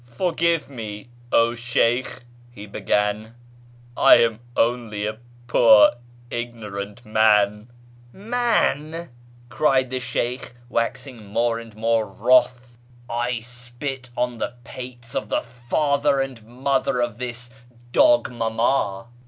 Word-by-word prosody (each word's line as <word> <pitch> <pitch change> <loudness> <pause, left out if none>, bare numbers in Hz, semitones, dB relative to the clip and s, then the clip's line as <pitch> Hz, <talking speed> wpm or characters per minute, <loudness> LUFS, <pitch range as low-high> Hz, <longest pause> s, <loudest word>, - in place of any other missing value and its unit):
" - - -25
Forgive 165 +5 0
me, 110 -4 -8 0.2
0 115 0 +3
Sheykh! 120 +1 0
" 120 0 -26
he 105 - -9
began; 105 +2 -1 0.3
" 120 - -26 0.2
I - - +7
am 115 -1 +2 0.2
only 115 -3 0
a 110 +1 -4 0.3
poor 115 -2 +6 0.4
ignorant 110 -2 -6
man 105 -1 +3 0.2
" 120 0 -26
" 120 0 -25
j\Ian! 195 - 0 0.2
" 120 0 -26
cried 130 -3 +2
the 130 - -2
Sheykh, 125 0 -3
waxing 120 0 -3
more 115 +3 0
and 115 -2 -12
more 115 0 +1
wroth; 125 +3 +2 0.2
" 120 0 -26
I 120 0 -1
spit 125 +2 -6
on 125 -1 -1
the 120 - -3
pates 120 -1 -9
of - - -3
the - - +1
father 140 +4 0
and 135 -4 -4
mother 135 +1 0
of 120 -2 -2
the 125 -1 -4 0.5
dog 300 - +4
mama 115 -3 0
120 Hz, 135 wpm, -23 LUFS, 115-130 Hz, 0.5 s, I